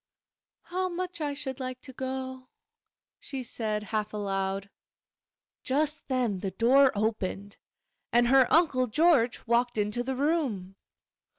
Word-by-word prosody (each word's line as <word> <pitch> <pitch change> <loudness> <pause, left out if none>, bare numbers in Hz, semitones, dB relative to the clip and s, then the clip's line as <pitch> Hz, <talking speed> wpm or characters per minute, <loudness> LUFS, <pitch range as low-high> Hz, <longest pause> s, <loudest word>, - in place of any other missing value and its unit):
'How 370 +1 -2
much 360 -1 -4
I 290 -1 -1
should 275 -2 -5
like 255 -1 -5
to 260 - -8
go!' 260 0 -5 0.7
she 265 -2 -5
said, 215 -3 -2
half 215 0 -1
aloud. 195 -1 -2 0.9
Just 295 +3 0
then 245 -7 0
the 195 - -2
door 255 +7 +5
opened, 205 -2 -2 0.5
and 240 0 +4
her 265 -1 +5
Uncle 285 -7 +4
George 270 -2 +3
walked 240 0 +1
into 210 +3 0
the 265 +2 -2
room. 260 - -1
255 Hz, 125 wpm, -28 LUFS, 210-280 Hz, 0.9 s, door